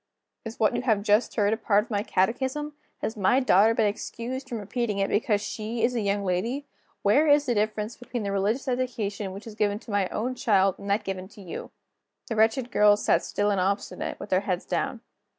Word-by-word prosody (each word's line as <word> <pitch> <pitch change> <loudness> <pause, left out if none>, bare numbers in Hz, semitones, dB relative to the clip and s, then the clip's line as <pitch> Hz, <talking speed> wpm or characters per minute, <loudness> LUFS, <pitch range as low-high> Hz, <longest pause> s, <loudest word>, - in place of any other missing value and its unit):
"Is 225 0 -8
what 215 - +3
you - - 0
have 220 -5 +1
just 210 +3 +2
heard 205 -1 +2
a - - -1
part 210 -2 +2
of 235 - -15
my 205 -1 +1
catechism? 260 +10 -1 0.3
Has 220 - -2
my 210 +5 +3
daughter 225 -3 +4
been 225 - +3
excused 245 +5 -4
from 235 - -3
repeating 215 0 -2
it 195 0 0
because 210 -1 +1
she 220 +3 -4
is 245 +2 +3
a 235 - 0
young 200 0 0
lady? 230 +10 -1 0.4
Where 280 +10 +4
is 290 0 +5
the 245 - +1
difference 215 +1 -1
between 245 -2 -5
the 200 - -2
religious 210 +8 0
education 230 -6 -2
which 195 +3 -9
is 225 - -8
given 205 -1 0
to 225 +1 -11
my 200 -2 +1
own 245 +4 -2
child, 195 -6 +2
and 200 - -7
that 205 +2 +1
given 190 -2 -4
to 205 +1 -15
you?" 175 - -7 0.6
The 225 - -2
wretched 225 +3 +2
girls 210 0 +4
still - - +4
sat - - -15
silent 205 -1 0
and 185 - +2
obstinate, 200 0 -3
with - - -8
their 185 - +4
heads 185 -3 -2
down. - - -2
215 Hz, 220 wpm, -26 LUFS, 200-240 Hz, 0.6 s, is